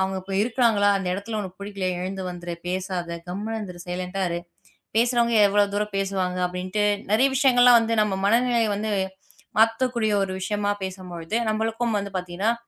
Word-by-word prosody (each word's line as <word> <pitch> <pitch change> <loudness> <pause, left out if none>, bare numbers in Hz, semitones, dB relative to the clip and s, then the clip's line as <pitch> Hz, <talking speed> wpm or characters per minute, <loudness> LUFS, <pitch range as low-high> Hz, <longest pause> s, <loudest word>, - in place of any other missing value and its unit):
அவங்க 190 0 0
இப்ப 195 +1 -8
இருக்காங்களா? 225 -3 +3
அந்த 185 -2 -3
இடத்துல 210 +3 -4
உனக்குப் 190 -1 -8
புடிக்கலயா? 190 -3 -3
எழுந்து 190 +1 -4
வந்துரு. 175 -1 -6
பேசாத. 185 -1 -3 0.2
கம்முனு 210 +5 -3
இருந்துரு. 180 -4 -7
சைலெண்டா 180 +2 -3
இரு. 170 0 -2 0.6
பேசுறவங்க 235 -1 +2
எவ்ளோ 205 +1 +4
தூரம் 210 -1 -2
பேசுவாங்க?" 190 -2 -1
அப்படின்ட்டு 185 +3 -2 0.3
நிறைய 255 +5 +5
விஷயங்கள்லாம் 245 -3 +6
வந்து 230 0 0
நம்ம 210 -2 0
மனநிலையை 235 +1 +3
வந்து 215 +1 -2 0.7
மாத்தக்கூடிய 225 -1 +2
ஒரு 190 - -5
விஷயமா 205 +1 -1
பேசும்பொழுது, 180 0 -5
நம்மளுக்கும் 225 +1 -1
வந்து 200 0 -6
பாத்தீங்கன்னா 180 +5 -1
200 Hz, 150 wpm, -24 LUFS, 185-225 Hz, 0.7 s, விஷயங்கள்லாம்